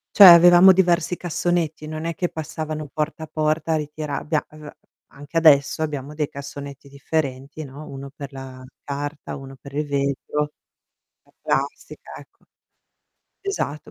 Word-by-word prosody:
Cioè, 200 - +11
avevamo 175 +2 +9
diversi 175 -1 +2
cassonetti, 170 -3 -2
non 155 0 -5
è 170 - -2
che 175 - -1
passavano 155 -1 -5
porta 155 +1 -3
a - - -7
porta 155 +1 0
a - - +2
ritira 150 -1 -4
abbia 155 -1 -1
uhm, 155 -1 -11 0.4
anche 145 +4 -6
adesso 150 -2 +5
abbiamo 145 -1 -4
dei 150 -1 -1
cassonetti 140 0 -9
differenti, 140 0 -3
no, 145 +2 -10
1 140 0 -8
per 140 0 -8
la 130 -1 -9 0.2
carta, 145 +1 -5
1 135 -1 -10
per 140 +1 -12
il 150 +1 -1
vetro, 140 +1 -1 0.7
la - - -29
plastica, - - -3
ecco. - - -17 1.0
Esatto, 150 - -4
150 Hz, 145 wpm, -22 LUFS, 140-160 Hz, 1.0 s, Cioè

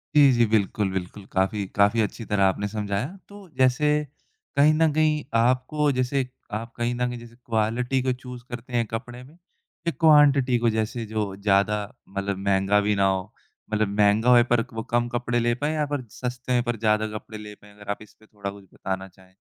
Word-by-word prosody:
जी, 145 -2 +7
जी, 120 -1 +4
बिल्कुल, 105 -2 +1
बिल्कुल, 95 +2 -5
काफ़ी 95 +2 0
काफ़ी 100 +3 +4
अच्छी 110 +2 -3
तरह 105 -2 +1
आपने 95 +2 +1
समझाया। 105 +2 -2 0.2
तो 200 -1 -12
जैसे, 130 +3 +3 0.7
कहीं 150 +2 +6
न 160 0 +3
कहीं 155 -1 +2 0.2
आपको, 130 +5 +2
जैसे 130 0 0 0.3
आप 115 +2 -4
कहीं 120 +1 0
न 125 0 0
कहीं 120 -1 -6
जैसे 115 0 -13
क्वालिटी 120 +4 0
को 130 -1 +1
चूज़ 125 -1 -10
करते 120 +1 -8
हैं 120 -1 +2
कपड़े 120 +2 -6
में, 135 +4 -16 0.5
या - - +3
क्वांटिटी 140 -5 +5
को? 120 0 +2
जैसे 110 +2 -2
जो 105 -2 -3
ज़्यादा 100 +1 +2 0.3
मतलब 100 0 -3
महँगा 100 +1 +2
भी 105 0 +1
ना 100 -1 +2
हो, 95 -1 0 0.5
मतलब 110 0 +2
महँगा 105 +3 +4
होए, 120 -1 +7
पर 120 -1 +2
क 125 - -18
वो 115 0 -4
कम 120 0 +2
कपड़े 120 0 0
ले 120 0 +2
पाएँ 150 +1 +1
या 150 -1 +1
फिर 130 -4 -2
सस्ते 125 +2 -5
हैं, 120 -1 +2
पर 120 -2 -2
ज़्यादा 110 0 +1
कपड़े 110 0 -10
ले 105 0 -9
पाएँ? 105 0 -19
अगर 105 0 -6
आप 100 - -5
इसपे 110 0 -17
थोड़ा 100 -2 -6
कुछ 100 0 -13
बताना 95 0 -4
चाहें। 95 0 -22
115 Hz, 205 wpm, -25 LUFS, 105-125 Hz, 0.7 s, जी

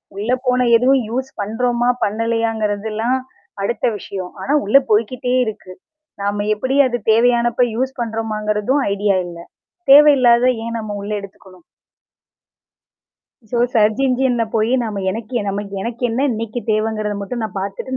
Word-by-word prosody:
உள்ள 210 +5 -2 0.2
போன 250 0 +2
எதுவும் 260 +2 +3
யூஸ் 260 +3 -3
பண்றோமா? 240 +3 0
பண்ணலையாங்கறதெல்லாம் 220 +1 -1 0.5
அடுத்த 235 - -1
விஷயம். 185 -2 -7
ஆனா 275 +9 -1
உள்ள 215 +7 +5
போய்க்கிட்டே 235 +4 0
இருக்கு. 195 -4 -7 0.5
நாம 205 +1 -1
எப்படி 260 +6 -2
அது 245 - -2
தேவையானப்ப 240 +1 +3
யூஸ் 260 +3 -2
பண்றமாங்கிறதும் 220 +3 -1
ஐடியா 200 -1 +1
இல்ல. 170 -1 -9 0.5
தேவையில்லாதத 260 -4 +6 0.2
ஏன் 230 0 -3
நம்ம 215 -1 -5
உள்ள 205 - -6
எடுத்துக்கணும்? 190 -2 -14 1.9
ஸோ, 240 - -1 0.2
சர்ச் 215 +2 +3
இன்ஜின்ல 250 -2 +1
போயி 225 +3 +2
நம்ம 205 -3 -4
எனக்கு 220 +4 -7
எ - - -3
நம்ம 200 +1 -2 0.2
எனக்கு 235 +3 -5
என்ன 260 +5 0
இன்னைக்கு 230 +1 -4
தேவைங்கிறத 215 -1 -1
மட்டும் 235 +4 -4
நான் 210 -2 -5
பார்த்துட்டு 200 +7 -4
225 Hz, 135 wpm, -19 LUFS, 210-245 Hz, 1.9 s, தேவையில்லாதத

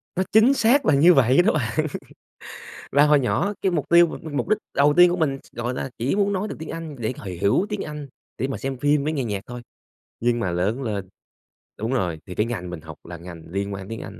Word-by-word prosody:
Nó 185 - +1
chính 220 +5 +6
xác 270 +2 +3
là 155 - +4
như 165 +6 +6
vậy 135 +2 +5
đó 215 - +2
bạn 120 -1 -1 1.1
và 140 +2 +5
hồi 150 -1 +5
nhỏ 170 +10 0
cái 190 - +1
mục 160 -5 -1
tiêu 170 0 +7
mà - - -6
mục 145 - -2
đích 215 - +3 0.2
đầu 145 +1 +4
tiên 175 0 +8
của 175 - -1
mình, 145 -5 0 0.2
gọi 120 +1 -3
là, 130 - -4
chỉ 125 +8 0
muốn 200 0 +1
nói 195 +2 -2
được - - -6
tiếng 160 - -7
Anh 165 -3 -6
để 115 +1 -2
h - - -10 0.2
hiểu 100 - +3
tiếng 210 -1 -3
Anh, 150 -1 -7 0.3
để 130 - -1
mà 135 - -4
xem 135 -1 -4
phim 145 +2 +2
với 155 +2 -1
nghe 140 -4 -1
nhạc 105 -4 -3
thôi, 120 0 -7 0.6
nhưng 120 0 +1
mà 95 -6 -1
lớn 100 +9 -1
lên 100 -5 -4 0.7
đúng 115 +4 -2
rồi, 90 -10 -1
thì 90 - -8
cái 105 - +1
ngành 110 -7 -4
mình 90 -3 -7
học - - -10
là 85 0 -9
ngành 85 -1 -10
liên 100 +1 -2
quan 95 0 -6
đến - - -13
tiếng 115 0 -6
Anh, 105 - -12
135 Hz, 255 wpm, -23 LUFS, 110-165 Hz, 1.1 s, tiên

